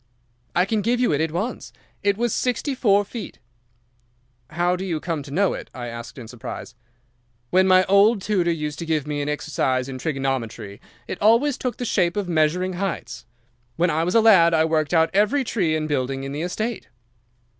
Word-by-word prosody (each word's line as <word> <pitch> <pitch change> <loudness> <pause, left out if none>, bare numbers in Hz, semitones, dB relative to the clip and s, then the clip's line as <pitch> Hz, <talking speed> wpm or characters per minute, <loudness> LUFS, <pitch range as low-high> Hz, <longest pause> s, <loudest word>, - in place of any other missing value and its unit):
"'I 180 - +4
can 215 +1 0
give 240 +4 +1
you 245 - +2
it 145 - +1
at 160 -1 0
once. 200 +10 -4 0.3
It 200 -1 +1
was 235 -1 0
sixty 255 +3 -1
four 205 -5 +3
feet.' 225 +2 -8 1.1
"'How 175 +3 +1
do 185 - -5
you 170 -5 -2
come 165 -2 -3
to 140 - -11
know 190 +7 +1
it?' - - -7
I 120 -2 -5
asked, 115 +1 -8
in 120 -4 -9
surprise. 120 +1 -8 0.8
"'When 185 +1 +4
my 185 0 +6
old 200 +3 +4
tutor 190 -3 0
used 150 -3 -3
to 170 - -4
give 155 -3 0
me 150 -1 -3
an 145 - -2
exercise 130 -3 -1
in 130 -1 -6
trigonometry, 125 -8 -3 0.3
it - - -6
always 235 +7 +4
took 250 -3 -4
the 245 - -4
shape 180 -4 +1
of 205 -3 -1
measuring 175 +3 +1
heights. 190 +1 -4 0.5
When 170 +3 +2
I 160 +2 +1
was 180 +4 -1
a 230 - +6
lad 175 -7 +6
I 160 0 +3
worked 155 -2 0
out 160 0 +3
every 215 +8 +2
tree 180 -10 0
and 155 -1 -2
building 135 -2 -2
in 135 - -5
the 145 +2 -4
estate. 215 +6 -3
170 Hz, 200 wpm, -23 LUFS, 150-205 Hz, 1.1 s, my